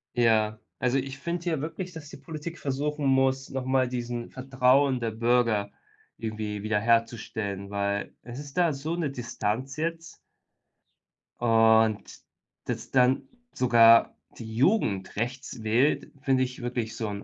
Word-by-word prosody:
Ja. 110 -2 +2 0.2
Also 125 +1 +1
ich 135 0 -4
finde 170 +4 -4
hier 160 -5 -1
wirklich, 175 +3 -5
dass 150 -3 -9
die - - -10
Politik 155 +4 -7
versuchen 145 +1 -2
muss, 135 0 +2
noch 135 -1 -3
mal 130 -1 +2
diesen 120 -1 -4
Vertrauen 130 0 +2
der 115 -1 -2
Bürger 115 -3 +1 0.5
irgendwie 105 -2 -4
wiederherzustellen, 110 -2 0
weil 100 0 -2
es 120 +2 -9
ist 145 +2 -10
da 170 -4 +3
so 155 +5 -3
'ne 165 -5 -1
Distanz 125 +1 -3
jetzt 165 +1 -4 1.2
Und 110 -2 +4 0.6
dass - - -5
dann 130 +1 +3 0.3
sogar 115 -2 +5 0.2
die 110 -1 -8
Jugend 115 - +1
rechts 120 0 -4
wählt, 120 +7 +2
finde 130 -2 +2
ich 125 -1 -5
wirklich 120 -2 -3
so 110 - -3
'n 100 0 -5
125 Hz, 140 wpm, -27 LUFS, 110-135 Hz, 1.2 s, sogar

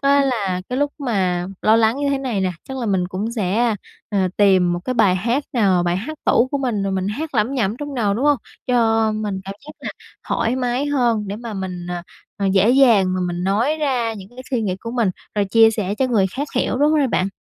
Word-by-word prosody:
á 280 0 +4
là 200 -8 -1
cái 250 - -2
lúc 290 0 0
mà 185 -9 0 0.2
lo 220 +1 +5
lắng 225 +2 +3
như 285 0 -1
thế 275 - 0
này 250 -7 -2
nè, 185 -1 0 0.2
chắc 265 - -5
là 240 - -3
mình 185 -3 0
cũng 205 +5 -3
sẽ, 220 +1 +1 0.4
ờ, 195 -2 +1
tìm 185 -4 +4
một 175 - -2
cái 255 - -2
bài 210 -6 +4
hát 240 +9 0
nào, 195 -7 +3
bài 175 0 0
hát 300 +10 -6
tủ 250 +2 +3
của 280 - -1
mình 240 -7 -1
rồi 195 0 -1
mình 190 0 -1
hát 290 +7 -4
lẩm 225 +5 +1
nhẩm 220 -4 0
trong 290 +1 -6
đầu, 210 -5 +1
đúng 245 +7 -1
hông? 290 -2 +4 0.3
Cho 225 -3 +2
mình 210 -3 -3
cảm 195 - -6
giác 300 - -9
là - - -4 0.4
thoải 230 +3 0
mái 255 +2 -1
hơn 235 -7 +1
để 200 - -4
mà 230 -1 -7
mình, 185 -2 -5
à, 175 -1 -4 0.3
à, 200 - -1
dễ 195 +3 +4
dàng 230 -8 +5
và 185 - -1
mình 175 0 -3
nói 225 +11 +1
ra 255 -7 0
những 195 -3 -10
cái 245 +3 -19
suy 245 -4 0
nghĩ 185 -3 -1
của 230 - -6
mình 230 -5 +1 0.2
rồi 205 - +1
chia 225 +3 +5
sẻ 205 -3 -2
cho 260 +4 +1
người 220 -6 +2
khác 275 +10 -4
hiểu, 250 0 0
đúng 295 +2 +3
rồi 295 -3 +3
bạn. 190 -4 +1
225 Hz, 250 wpm, -20 LUFS, 195-255 Hz, 0.4 s, lo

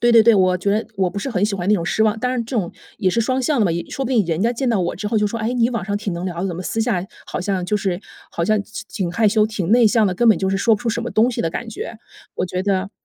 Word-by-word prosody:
对 240 - +5
对 230 -1 +7
对， 230 0 +6
我 185 -2 +3
觉 200 +4 0
我 190 -1 +2
不 180 - -11
是 265 - -3
很 200 -4 +1
喜 210 -1 0
欢 185 -1 -3
那 210 - +5
种 170 -5 -1
失 220 - +1
望， 215 0 +2
但 255 +1 0
是 240 - 0
这 240 +2 -4
种 180 -5 -1 0.3
也 190 - +2
是 210 +6 +1
双 255 +3 0
向 265 0 +1
的 - - +4
嘛， - - +1
也 170 0 -3
说 270 - -3
不 255 - -3
定 230 -6 +3
人 165 +2 -1
家 235 +2 +2
见 255 +2 -1
到 225 -5 +2
我 175 -1 -2
之 210 +3 -4
后 220 - 0
就 210 -1 +3
说， 230 - -4
哎， 220 +2 -1
你 240 -1 +2
网 230 -6 -3
上 205 +1 -1
挺 205 -2 -3
能 170 +1 -4
聊 175 -2 -4
的， 195 - -1
怎 175 - -4
么 185 - -5
私 225 - -2
下 220 -6 0 0.2
好 - - -4
像 185 -1 -1
就 210 +4 0
是， 190 -3 -2 0.3
好 170 - -2
像 215 +3 +2
其 215 - -8
挺 185 -4 -3
害 215 +3 +3
羞 215 +1 +3
挺 205 -5 -3
内 235 0 +6
向 220 0 +3
的， 185 - 0
根 235 +5 +3
本 220 - +6
就 190 -1 -1
是 195 - +1
说 225 +3 +3
不 210 - -6
出 240 - -1
什 235 - -2
么 240 - -3
东 230 +3 +3
西 245 - -3
的 165 - 0
感 230 +7 -5
觉。 225 +1 -6 0.4
我 - - -1
觉 185 0 -3
得 195 -1 0
210 Hz, 375 characters per minute, -20 LUFS, 185-230 Hz, 0.4 s, 对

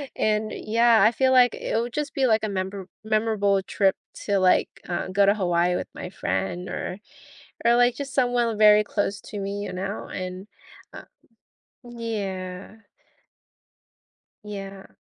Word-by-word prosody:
and, 215 0 0
yeah, 230 -1 +3
I 220 - +6
feel 260 +2 +2
like 250 -2 +5
it - - -4
would 235 +1 -2
just 300 +1 -3
be 270 - +1
like 220 -2 +2
a - - -3
member 190 0 -4 0.2
memorable 215 -2 +1
trip 195 0 +1 0.3
to, 200 -2 +1
like, 185 -1 +3 0.2
uh, 175 - -2
go 200 +1 +3
to 200 - +5
Hawaii 175 -2 +1
with - - -4
my 180 - -7
friend 185 -1 -3
or 180 +2 -5 0.7
or, 235 +1 +5
like, 245 0 +4
just 280 -1 -6
someone 245 -4 +1
very 210 0 +7
close 205 -1 -2
to 210 - -8
me, 200 +1 -4
you - - -5
know, 195 +3 -5
and, 185 +2 -6 0.4
uh - - -10 0.8
Yeah. 200 -6 -5 1.7
Yeah. 195 -2 -8
205 Hz, 150 wpm, -24 LUFS, 190-230 Hz, 1.7 s, very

